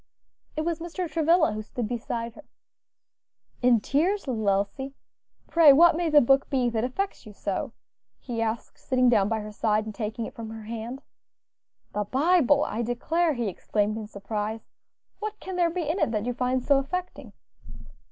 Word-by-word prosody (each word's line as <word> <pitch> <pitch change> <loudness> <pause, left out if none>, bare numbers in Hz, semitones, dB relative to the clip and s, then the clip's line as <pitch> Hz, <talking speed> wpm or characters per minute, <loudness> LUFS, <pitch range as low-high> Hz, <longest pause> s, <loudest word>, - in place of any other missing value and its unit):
It - - +1
was 335 0 -1
Mr. 345 +2 -4
Travilla 325 -3 +3
who 215 0 -4
stood 225 +1 -4
beside 230 0 -4
her. 305 - -14 1.2
"In 245 -2 +5
tears, 330 - 0
little 220 -5 0
Elsie! 205 +8 -1 0.5
Pray, 330 -4 +7
what 330 +4 +7
may 340 0 0
the 300 -1 +7
book 270 +3 +3
be 250 -3 +1
that 225 -1 -1
effects 260 - -3
you 210 - -10
so?" 205 +6 -3 0.4
he 235 -3 -4
asked, 225 0 -3
sitting 255 -2 +2
down 210 -4 +3
by 220 -1 -1
her 210 0 -7
side 215 0 0
and 215 - -6
taking 220 +1 -4
it - - -8
from 225 -1 -7
her 220 0 -8
hand. 230 +4 -6 0.9
"The 210 0 -1
Bible, 290 - +3
I 230 - -2
declare!" 315 +8 0
he 240 -2 -1
exclaimed 205 +2 -1
in 220 -1 -5
surprise. 210 +2 -4 0.5
"What 425 0 -5
can 375 - -6
there 350 -1 +3
be 335 -2 -3
in 325 +6 0
it - - +2
that 215 -1 -2
you 245 - -1
find 250 +1 0
so 280 0 +4
affecting?" 360 +7 -5
245 Hz, 180 wpm, -26 LUFS, 220-315 Hz, 1.2 s, Pray